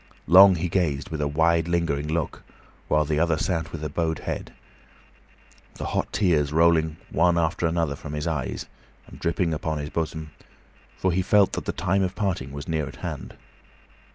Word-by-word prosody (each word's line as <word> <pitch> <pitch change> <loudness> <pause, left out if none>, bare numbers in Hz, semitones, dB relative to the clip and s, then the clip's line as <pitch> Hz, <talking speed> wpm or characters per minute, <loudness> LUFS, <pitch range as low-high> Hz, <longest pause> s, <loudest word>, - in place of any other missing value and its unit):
Long 95 +4 +8
he 85 +1 -1
gazed, 80 -6 -1
with 80 -2 -3
a 75 - +1
wide, 80 +3 +2
lingering 85 -4 0
look, 80 0 -2 0.5
while 75 0 +2
the 75 0 0
other 80 -1 +2
sat 80 -2 -2
with 75 -2 -5
bowed 80 -1 0
head, - - -5 1.2
the - - -5
hot - - -2
tears 80 -8 +2
rolling 80 -1 +3
one 85 +1 +3
after 85 +1 +1
another 80 -3 0
from 75 +1 -8
his 75 0 -3
eyes, 75 -5 -3 0.4
and - - -13
dripping 85 0 0
upon 80 0 -2
his 75 0 -5
bosom, 80 -1 -3 0.7
for 95 - +1
he 90 +2 +1
felt 100 +1 +4
that - - -3
the - - -1
time 95 +2 0
of 95 -1 -1
parting 90 -10 -2
was 70 +3 -7
near 80 -3 -1
at - - -9
hand. - - -6
80 Hz, 180 wpm, -25 LUFS, 75-85 Hz, 1.2 s, Long